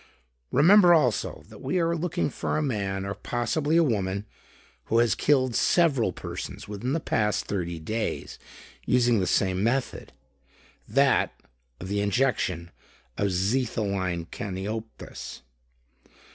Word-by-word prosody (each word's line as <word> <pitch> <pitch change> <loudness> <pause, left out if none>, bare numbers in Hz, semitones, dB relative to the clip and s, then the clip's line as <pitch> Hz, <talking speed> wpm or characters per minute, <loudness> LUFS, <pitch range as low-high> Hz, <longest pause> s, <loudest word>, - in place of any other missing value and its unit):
Remember 175 +4 +7
also, 125 -9 0
that - - -13
we 185 - 0
are 170 0 +1
looking 175 -2 -1
for - - -2
a - - +1
man 100 -7 -2
or 100 - -3
possibly 125 - -1
a 170 - +6
woman 100 -6 -1 0.6
who 115 - +1
has 115 -3 +4
killed 130 +1 +2
several 150 -10 +3
persons - - -7
within 105 +6 -3
the 165 - +1
past 105 -8 0
thirty 85 -4 -3
days, 110 +8 -4 0.4
using 120 -3 +3
the 95 - 0
same 95 -1 +1
method; 125 +4 -1 0.8
that - - +2 0.4
of 90 - -7
the 100 +1 -1
injection 100 -6 0 0.4
of 100 - 0
xetholine 100 -3 -1
caniopus. 105 +4 -6
110 Hz, 125 wpm, -26 LUFS, 100-135 Hz, 0.8 s, Remember